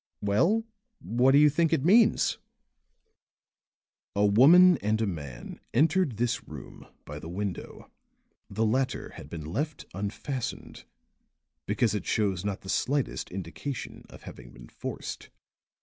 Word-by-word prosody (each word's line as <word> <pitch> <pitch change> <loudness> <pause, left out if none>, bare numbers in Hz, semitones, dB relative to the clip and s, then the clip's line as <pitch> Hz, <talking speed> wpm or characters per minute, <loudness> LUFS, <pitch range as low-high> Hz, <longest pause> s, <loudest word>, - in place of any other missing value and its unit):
"Well, 170 - +2 0.3
what 125 - +2
do - - +7
you 150 +1 +7
think 165 +2 +2
it 155 -3 +1
means?" 215 +5 +4 1.8
"A 100 +1 +3
woman 160 - +7
and 110 +2 0
a 110 - +1
man 75 - -7 0.2
entered 155 - +2
this 120 +1 -1
room 75 -5 -11 0.2
by 75 +1 -7
the 80 - -9
window; 95 0 -6 0.6
the 110 +3 -1
latter 130 +4 -1
had - - -11
been 80 -3 -7
left 145 - -4
unfastened 105 +7 -5 0.8
because 110 +2 +1
it 105 - -4
shows 95 -5 0
not 100 -2 -3
the - - -13
slightest 140 +6 -1
indication 95 - -6
of - - -14
having 60 -1 -11
been - - -14
forced. - - -7
110 Hz, 135 wpm, -28 LUFS, 95-145 Hz, 1.8 s, do